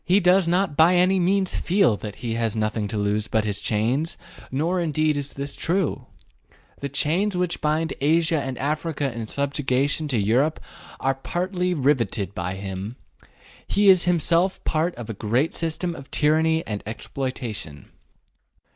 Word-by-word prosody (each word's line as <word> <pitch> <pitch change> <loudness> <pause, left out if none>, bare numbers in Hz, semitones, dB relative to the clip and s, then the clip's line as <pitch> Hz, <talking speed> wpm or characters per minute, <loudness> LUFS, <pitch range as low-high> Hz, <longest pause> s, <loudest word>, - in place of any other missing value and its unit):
He 185 +3 +4
does 180 -1 +4
not 180 -2 +1
by 165 +4 +5
any 185 +2 +4
means 190 +1 +1
feel 185 - +3
that 105 -1 -7
he 115 - -1
has 115 -2 -1
nothing 110 -1 -1
to 105 - -4
lose 105 +1 0
but 110 -1 0
his 100 -1 -2
chains, 120 +9 0 0.3
nor 165 +7 0
indeed 155 -2 +1
is 145 -1 -4
this 140 0 -5
true. 180 -1 -1 0.7
The 140 - -4
chains 180 +8 +1
which 180 -1 -1
bind 155 +2 0
Asia 160 +1 +3
and 130 -2 -4
Africa 145 -1 -2
in 115 -2 -5
subjection 140 +2 0
to 130 -5 0
Europe 120 +10 +2 0.4
are 135 - +1
partly 180 +6 -2
riveted 120 - 0
by 90 0 -3
him. 95 +3 -5 0.7
He 200 0 +4
is 185 -2 +6
himself 175 +1 +2
part 160 +3 0
of 120 -3 -8
a 115 - -4
great 120 +9 0
system 170 +1 -2
of 135 -4 -11
tyranny 160 +2 +2
and 105 -2 -4
exploitation. 110 - -5
145 Hz, 155 wpm, -24 LUFS, 115-170 Hz, 0.7 s, is